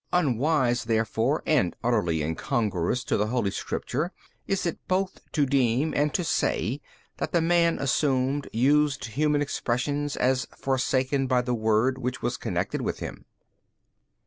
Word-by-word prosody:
B. - - +3
Unwise 135 -4 +1
therefore 115 +5 0
and 130 - +2
utterly 90 -10 +1
incongruous 95 +7 -1
to - - 0
the 105 +1 +1
holy 115 -4 0
Scriptures 150 - -3 0.4
is 195 -2 0
it 170 - -2
both 185 0 0
to 145 -3 +3
deem 135 +2 +1
and 145 +1 +2
to 180 - +1
say 130 - 0 0.4
that - - -3
the 170 - +4
man 170 0 +3
assumed 135 0 0
used 140 +3 +2
human 145 +5 +1
expressions 145 +2 -1
as 130 0 +1
forsaken 135 0 0
by 125 -1 +2
the 125 0 -1
Word 110 +3 +1
which 125 0 -3
was - - 0
connected - - -2
with - - -2
him. - - -7
130 Hz, 145 wpm, -26 LUFS, 120-150 Hz, 0.4 s, the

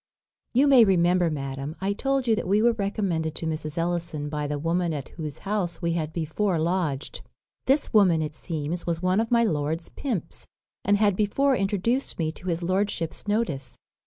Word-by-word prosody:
"You 265 +4 +5
may 270 -4 +7
remember, 180 -3 +3
madam, 135 0 -4
I 195 +1 0
told 270 +3 0
you 225 - +4
that 210 - -3
we 200 +3 +3
were 235 +2 +5
recommended 195 -7 -1
to - - -3
Mrs. 155 0 -3
Ellison 170 -3 -2
by 150 -1 -2
the 145 0 -2
woman 165 +2 0
at 140 -3 -5
whose 155 -4 -6
house 195 -5 -1
we 170 - 0
had 160 -2 -2
before 170 +4 -1
lodged. 160 -4 -1 0.5
This 275 +1 +2
woman, 190 -7 +5
it 155 -1 -2
seems, 160 +2 -4
was 170 0 -1
one 185 +2 +3
of 225 0 0
my 235 -1 +4
lord's 160 -3 -1
pimps, 210 - -4 0.4
and 205 +1 +3
had 205 -2 +3
before 265 +7 +2
introduced 210 +6 0
me 160 -2 0
to 180 - -11
his 170 0 -1
lordship's 185 -1 -1
notice. 155 - -1
175 Hz, 185 wpm, -26 LUFS, 155-205 Hz, 0.5 s, may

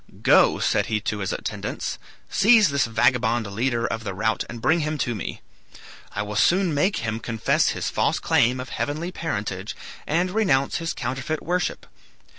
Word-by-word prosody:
"Go," - - +5
said - - +1
he 110 -1 0
to 105 0 -3
his 95 - -2
attendants, - - -4 0.3
"seize 215 -2 +5
this 140 -1 +1
vagabond 120 +1 +2
leader 115 +4 -1
of 115 -1 -3
the 100 -4 -4
rout 110 +3 0
and 120 - -7
bring 160 +8 +2
him 155 0 -2
to 120 -3 -1
me. 105 - -6 0.7
I 105 - -1
will 105 0 -6
soon 180 - +3
make 165 +8 +1
him 110 0 -2
confess 115 -1 +1
his - - -2
false - - +1
claim 125 +2 +2
of 125 - -6
heavenly 155 +5 -3
parentage 100 - -4 0.3
and 175 +4 +1
renounce 160 -11 +2
his 165 0 -3
counterfeit 130 +5 -3
worship." 180 +1 -1
125 Hz, 170 wpm, -24 LUFS, 110-160 Hz, 0.7 s, Go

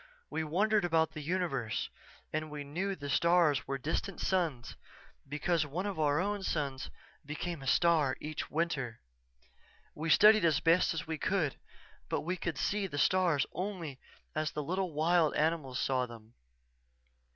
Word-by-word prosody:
We 160 - -1
wondered 205 +7 +2
about 160 -2 +2
the 155 - -7
universe 150 -9 -1 0.4
and 155 0 -2
we 150 -1 -6
knew 185 +8 -2
the 145 -5 -7
stars 170 -3 +3
were 135 0 -1
distant 160 +8 -3
suns 165 -11 -1 0.5
because 155 +3 +1
one 160 +6 -4
of 200 -5 -3
our 145 -1 +2
own 205 +2 -1
suns 140 -7 -2 0.3
became 155 +2 -4
a 135 - -7
star 155 -3 +3
each 155 0 -5
winter. 145 -8 -2 0.9
We 160 +2 -4
studied 215 +4 +7
as 160 -4 +4
best 165 -2 +2
we 160 -2 -4
could 180 -8 0 0.5
but - - 0
we 175 +4 -2
could 170 -4 -3
see 200 +8 0
the 145 - -6
stars 175 -3 +3
only 175 -7 -4 0.3
as 155 0 0
the 150 - -3
little 185 +3 -1
wild 160 +1 +2
animals 150 -5 0
saw 130 -2 +1
them. 115 -1 -13
160 Hz, 150 wpm, -32 LUFS, 145-180 Hz, 0.9 s, studied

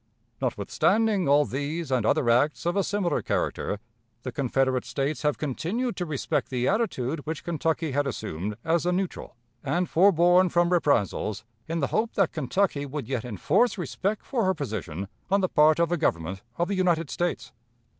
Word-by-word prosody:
Notwithstanding 215 -8 +1
all 145 +1 +5
these 145 +3 -3
and 120 -4 +1
other 145 -4 +2
acts 125 +8 +2
of 175 +2 +1
a 200 - +2
similar 200 -3 0
character, 105 - -1 0.5
the 130 - -4
Confederate 130 0 0
States 135 +3 -2
have 150 -1 +1
continued 185 - -2
to 180 - -2
respect 145 -4 -1
the 125 -1 -1
attitude 165 - 0
which 160 -1 -4
Kentucky 160 -2 -1
had 145 +1 0
assumed 105 -4 -4
as 170 +1 +1
a - - +3
neutral, 180 -7 -3 0.3
and 180 +1 0
forborne 180 +1 +5
from 175 +1 +2
reprisals, 110 - +1 0.2
in 165 0 -2
the 140 - +1
hope 220 +1 +1
that 195 -4 +2
Kentucky 155 +1 0
would 145 +1 -5
yet 130 -4 -2
enforce 155 - +1
respect 195 +5 -2
for 245 -5 0
her 190 0 +2
position 100 - -4 0.2
on 200 +1 +3
the 185 - +2
part 155 0 +5
of 170 -1 +2
the 175 - +1
Government 95 - -1 0.2
of 175 - +1
the 200 - -1
United 170 -6 +1
States. 175 0 -2
155 Hz, 175 wpm, -26 LUFS, 130-180 Hz, 0.5 s, all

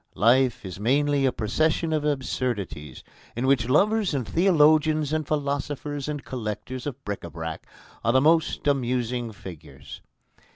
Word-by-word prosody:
Life 125 +2 +3
is 95 0 -7
mainly 140 +4 +2
a - - +2
procession 155 +9 0
of 155 -1 0
absurdities 125 - -3 0.3
in 120 +3 -1
which 130 -3 +2
lovers 200 +4 +2
and 125 -5 -2
theologians 155 -3 +3
and 155 -2 -1
philosophers 145 -1 -2
and 145 -2 -4
collectors 125 +2 -5
of 140 -1 -7
bric 100 -1 -4
à 85 - -8
brac 80 0 -6 0.4
are 115 - +3
the 130 - +4
most 160 +2 +2
amusing 125 -3 0
figures. 80 -8 -11
130 Hz, 140 wpm, -25 LUFS, 115-150 Hz, 0.4 s, the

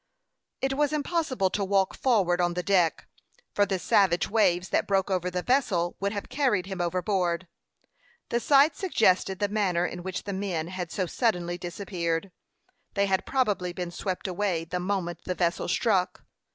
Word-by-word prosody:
It 270 0 +1
was 295 +2 +1
impossible 285 - 0
to 205 - -1
walk 195 -1 +2
forward 190 -9 +2
on 175 0 0
the 180 - -2
deck, 180 -4 +2 0.5
for 205 0 +3
the 190 - 0
savage 175 -1 +3
waves 185 -4 +2
that - - +1
broke 195 -1 +1
over 180 -1 0
the 180 0 -3
vessel 200 -10 +1
would 200 +1 -1
have 205 -1 -5
carried 250 -11 +1
him 190 -2 -4
overboard. 180 0 0 0.8
The 235 - +1
sight 280 +5 +5
suggested 195 - +2
the 205 - 0
manner 195 -4 +1
in 180 0 -5
which 185 +1 -4
the 200 - -4
men 185 -4 -2
had 180 -3 -5
so 185 - -1
suddenly 175 -4 -1
disappeared. 175 -1 -3 0.6
They 200 0 +3
had 190 -1 0
probably 205 -9 0
been 175 -1 -4
swept 185 +2 -4
away 180 -3 -1
the 180 +2 -3
moment 180 -2 -2
the 180 - -2
vessel 175 -1 0
struck. 195 -6 +1
190 Hz, 170 wpm, -27 LUFS, 175-205 Hz, 0.8 s, sight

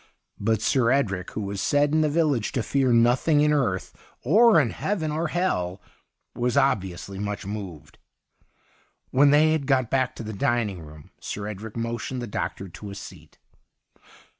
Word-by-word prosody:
But 110 +1 0
Sir 125 -4 +2
Edric, 100 -9 0
who - - -3
was 100 -1 -4
said 145 0 +2
in 155 - +3
the 155 - +2
village 145 -7 0
to 125 - -1
fear 135 0 +1
nothing 125 +6 +3
in 150 0 +3
earth, 115 -11 -1 0.3
or 215 - +6
heaven, 155 - -1
or 160 +3 -1
hell, 105 - -1 0.5
was 120 0 -1
obviously 95 -6 0
much 105 0 -4
moved. 100 -6 -8 1.1
When 140 +2 +5
they 150 +2 +5
had 155 -4 -1
got 130 -4 +1
back 130 -2 +1
to - - -7
the 110 0 -6
dining 105 -3 -1
room. 75 -1 -13
Sir 100 - -5
Edric 105 +2 -7
motioned 115 +2 -3
the 120 - -4
doctor 100 -2 -4
to 100 +4 -10
a 100 - -8
seat. 95 -6 -12
120 Hz, 165 wpm, -25 LUFS, 100-145 Hz, 1.1 s, or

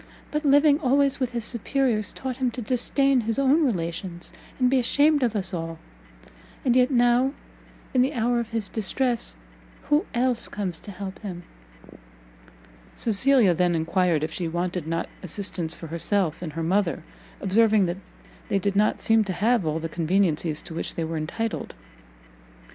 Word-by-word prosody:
But 300 +1 -1
living 285 +1 +5
always 275 -1 +2
with 255 -2 -1
his 235 -2 -2
superiors, 235 -3 0
taught 260 -2 -5
him 260 -2 +1
to 250 - -5
disdain 260 +3 +2
his 225 0 -2
own 275 +4 +4
relations, 175 - -3 0.2
and 255 - +3
be 260 +1 +3
ashamed 290 +4 +3
of 235 -3 +1
us 195 -1 -2
all; 165 -1 -4 0.9
and 250 -2 +3
yet 250 0 +4
now, 245 +1 +3 0.6
in 255 - +4
the 265 +4 +1
hour 240 +1 +1
of 235 -1 -4
his 225 -2 -3
distress 230 - -1 0.6
who 295 +2 +3
else 245 -1 +1
comes 185 -5 -4
to - - -11
help 195 0 -7
him?" 180 -5 -7 1.5
Cecilia 230 -2 +3
then 175 0 +1
enquired 165 -1 +1
if 155 - -2
she 170 +1 -3
wanted 175 0 -2
not 165 +1 -2
assistance 180 -2 -2
for - - -9
herself 170 +1 -1
and 160 -4 -5
her 165 +1 -3
mother, 185 +1 0 0.4
observing 210 +1 +3
that 175 +1 -2 0.5
they 200 - +2
did 195 +1 -1
not 210 +1 +2
seem 225 -1 +4
to 190 - -2
have 215 0 +1
all 155 +1 0
the 165 0 -3
conveniencies 165 -2 0
to - - -9
which 165 - -4
they 165 - -2
were 160 0 -3
entitled. 215 +9 -4
210 Hz, 165 wpm, -25 LUFS, 175-250 Hz, 1.5 s, living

